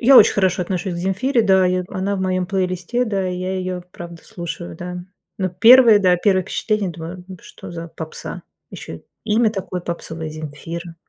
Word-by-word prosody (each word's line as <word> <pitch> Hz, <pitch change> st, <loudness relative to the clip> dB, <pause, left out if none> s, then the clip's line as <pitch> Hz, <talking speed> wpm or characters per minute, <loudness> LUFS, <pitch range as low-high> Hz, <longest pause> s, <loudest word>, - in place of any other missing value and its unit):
Я 260 Hz, +3 st, +7 dB
очень -, -, +8 dB
хорошо 190 Hz, -2 st, +2 dB
отношусь 185 Hz, +1 st, -3 dB
к -, -, -5 dB
Земфире. 210 Hz, +8 st, +1 dB
Да, 190 Hz, -3 st, +4 dB
и 180 Hz, 0 st, +1 dB
в 180 Hz, -, -15 dB
она 200 Hz, +1 st, -2 dB
в -, -, -3 dB
моём 185 Hz, -1 st, 0 dB
плейлисте, 185 Hz, +5 st, -1 dB
да, 195 Hz, -5 st, -1 dB
и 180 Hz, -, -3 dB
я 185 Hz, +1 st, -3 dB
её 185 Hz, -1 st, -3 dB
правда 170 Hz, -1 st, -10 dB
слушаю, 165 Hz, -, -7 dB
да. 180 Hz, 0 st, -6 dB, 0.4 s
Но 190 Hz, -2 st, 0 dB
первые, 230 Hz, +4 st, +7 dB
да, 185 Hz, -3 st, +4 dB
первые 190 Hz, +1 st, +2 dB
впечатления, 210 Hz, 0 st, -1 dB
думаю: 170 Hz, +2 st, -8 dB
"Ну 185 Hz, -, -8 dB
что -, -, -11 dB
за 170 Hz, 0 st, -7 dB
попса, 160 Hz, -1 st, -7 dB, 0.3 s
ещё -, -, -8 dB, 0.2 s
имя 220 Hz, +1 st, +3 dB
такое 185 Hz, -3 st, -4 dB
попсовое- 165 Hz, -2 st, -5 dB
Земфира. 160 Hz, +3 st, -7 dB
185 Hz, 190 wpm, -20 LUFS, 175-200 Hz, 0.4 s, очень